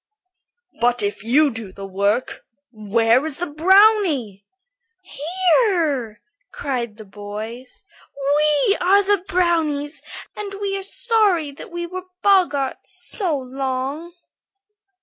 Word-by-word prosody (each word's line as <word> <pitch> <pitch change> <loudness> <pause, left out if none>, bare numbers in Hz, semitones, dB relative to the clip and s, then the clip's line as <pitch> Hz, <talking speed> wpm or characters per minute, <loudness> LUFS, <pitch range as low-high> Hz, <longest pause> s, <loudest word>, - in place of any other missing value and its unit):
"But 240 -1 +1
if 205 0 -3
you 280 +6 +3
do 225 -4 -6
the 195 +1 -9
work, 200 +5 -1 0.3
where 225 +3 +2
is 310 -3 -3
the 350 -3 -4
brownie?" 330 - +3 0.6
"Here," 335 - 0 0.3
cried 250 - -4
the 215 - -11
boys; 215 - -9 0.8
"we 405 - +2
are 395 +3 +4
the 400 -2 +1
brownies, 320 -5 0 0.3
and 405 -1 -6
we 400 -1 -2
are 390 - -3
sorry 395 -7 +2
that 280 - -11
we 345 0 -5
were 370 +1 -7 0.2
boggarts 350 -9 +1 0.2
so 355 -8 0
long." 270 +5 -4
295 Hz, 110 wpm, -21 LUFS, 235-370 Hz, 0.8 s, are